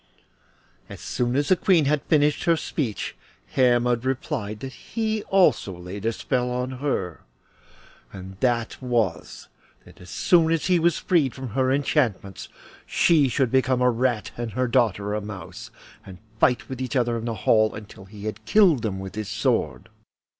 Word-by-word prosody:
As -, -, -9 dB
soon 120 Hz, 0 st, -2 dB
as 145 Hz, +1 st, 0 dB
the 185 Hz, -, +6 dB
Queen 175 Hz, -3 st, +3 dB
had 145 Hz, +1 st, +1 dB
finished 150 Hz, -1 st, +1 dB
her 170 Hz, -1 st, +3 dB
speech 120 Hz, -, -3 dB, 0.4 s
Hermod 120 Hz, -2 st, +2 dB
replied 125 Hz, -5 st, -3 dB
that 130 Hz, -1 st, -6 dB
he 220 Hz, -1 st, -3 dB
also 180 Hz, -, +2 dB
laid 95 Hz, +5 st, -6 dB
a -, -, +2 dB
spell 125 Hz, +2 st, -2 dB
on 125 Hz, +1 st, -2 dB
her, 90 Hz, -, -2 dB, 0.9 s
and 95 Hz, 0 st, -9 dB
that 120 Hz, -2 st, -1 dB
was, 115 Hz, -9 st, -2 dB, 0.4 s
that -, -, -17 dB
as 90 Hz, -, -13 dB
soon 160 Hz, +8 st, +3 dB
as 165 Hz, -2 st, 0 dB
he 180 Hz, -2 st, +3 dB
was 170 Hz, 0 st, +2 dB
freed 155 Hz, -8 st, +1 dB
from 130 Hz, -2 st, -6 dB
her 130 Hz, +4 st, 0 dB
enchantments 125 Hz, -, -1 dB, 0.4 s
she 155 Hz, -5 st, +3 dB
should 125 Hz, -1 st, 0 dB
become 130 Hz, -1 st, +2 dB
a 125 Hz, -, +4 dB
rat 120 Hz, -2 st, -1 dB
and 120 Hz, -2 st, -4 dB
her 130 Hz, 0 st, 0 dB
daughter 105 Hz, -5 st, +1 dB
a 105 Hz, -, -2 dB
mouse, 105 Hz, -2 st, -9 dB, 0.3 s
and 95 Hz, -2 st, -11 dB, 0.2 s
fight 120 Hz, +1 st, +2 dB
with 130 Hz, -1 st, -6 dB
each 130 Hz, +2 st, -4 dB
other 120 Hz, -2 st, +1 dB
in 115 Hz, 0 st, -4 dB
the 115 Hz, -1 st, -2 dB
hall 110 Hz, 0 st, +2 dB
until 105 Hz, -2 st, -11 dB
he 105 Hz, +2 st, -6 dB
killed 185 Hz, -, +5 dB
them 105 Hz, -4 st, -3 dB
with 95 Hz, -1 st, -7 dB
his 105 Hz, -2 st, -5 dB
sword. 110 Hz, +1 st, -1 dB
125 Hz, 170 wpm, -24 LUFS, 110-140 Hz, 0.9 s, the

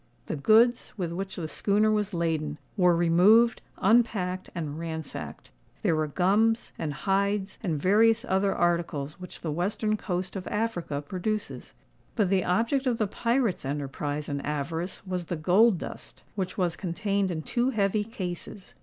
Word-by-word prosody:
The -, -, -3 dB
goods, 225 Hz, -, +4 dB
with 175 Hz, -4 st, -2 dB
which 190 Hz, +2 st, -4 dB
the 165 Hz, -3 st, -4 dB
schooner 210 Hz, +6 st, +2 dB
was 210 Hz, -1 st, 0 dB
laden, 160 Hz, -4 st, -1 dB, 0.2 s
were 180 Hz, -4 st, +4 dB
removed, 185 Hz, +8 st, +5 dB, 0.2 s
unpacked, 195 Hz, -4 st, +2 dB
and 155 Hz, -3 st, -4 dB
ransacked. 160 Hz, -2 st, -6 dB, 0.3 s
There 165 Hz, -, +3 dB
were 155 Hz, 0 st, 0 dB
gums, 205 Hz, +8 st, +2 dB
and 155 Hz, -, -2 dB
hides, 195 Hz, +5 st, -1 dB
and 165 Hz, -8 st, -1 dB
various 225 Hz, -, +4 dB
other 195 Hz, -3 st, +1 dB
articles 170 Hz, -5 st, -1 dB
which 180 Hz, -1 st, -9 dB
the 160 Hz, -, -3 dB
western 205 Hz, +6 st, 0 dB
coast 185 Hz, -2 st, -3 dB
of 185 Hz, -2 st, -5 dB
Africa 180 Hz, -10 st, -2 dB
produces; 200 Hz, +7 st, -4 dB, 0.4 s
but 205 Hz, -5 st, +1 dB
the 190 Hz, -2 st, +3 dB
object 235 Hz, +9 st, +1 dB
of 240 Hz, -2 st, +1 dB
the 220 Hz, -, +1 dB
pirates' 235 Hz, 0 st, 0 dB
enterprise 145 Hz, +1 st, -3 dB
and 140 Hz, -1 st, -3 dB
avarice 160 Hz, +6 st, -3 dB
was 180 Hz, -2 st, -3 dB
the 175 Hz, -, -2 dB
gold 185 Hz, +6 st, +4 dB
dust, -, -, -9 dB
which 185 Hz, -3 st, -3 dB
was 180 Hz, -3 st, 0 dB
contained 200 Hz, +2 st, -1 dB
in 160 Hz, -3 st, -3 dB
two 240 Hz, +8 st, 0 dB
heavy 210 Hz, -3 st, +1 dB
cases. 190 Hz, -3 st, -7 dB
185 Hz, 155 wpm, -27 LUFS, 165-215 Hz, 0.4 s, removed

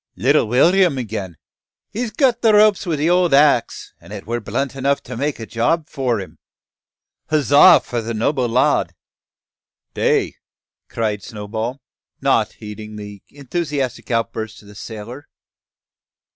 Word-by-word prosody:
"Little -, -, +2 dB
Will'm 170 Hz, -, +3 dB
again! 100 Hz, -8 st, -5 dB, 0.5 s
He's 235 Hz, +2 st, -3 dB
cut 240 Hz, +2 st, +1 dB
the 220 Hz, -2 st, +4 dB
ropes 210 Hz, -3 st, +4 dB
wi' 165 Hz, -, 0 dB
the 150 Hz, +2 st, 0 dB
old 175 Hz, -4 st, +3 dB
axe, 140 Hz, -4 st, +2 dB
an' -, -, -15 dB
it -, -, -8 dB
were 120 Hz, +2 st, -2 dB
blunt 125 Hz, +7 st, -3 dB
enough 140 Hz, +1 st, 0 dB
to 125 Hz, -, -8 dB
make 140 Hz, +3 st, -2 dB
a 115 Hz, -, -6 dB
job 150 Hz, +9 st, 0 dB
for 125 Hz, -6 st, -1 dB
him! 95 Hz, -, -10 dB, 0.9 s
Huzza 145 Hz, -2 st, +6 dB
for 120 Hz, -1 st, -4 dB
the 115 Hz, +1 st, -4 dB
noble 125 Hz, +2 st, 0 dB
lad!" 125 Hz, +3 st, +1 dB, 1.0 s
"Tay!" -, -, 0 dB, 0.5 s
cried 105 Hz, -3 st, -2 dB
Snowball, 110 Hz, +6 st, -6 dB, 0.4 s
not -, -, +1 dB
heeding 105 Hz, 0 st, -9 dB
the 105 Hz, -1 st, -9 dB
enthusiastic 140 Hz, -3 st, -4 dB
outburst 110 Hz, -2 st, -3 dB
of 100 Hz, -, -16 dB
the -, -, -13 dB
sailor. 115 Hz, +6 st, -9 dB
125 Hz, 140 wpm, -19 LUFS, 110-150 Hz, 1.0 s, Huzza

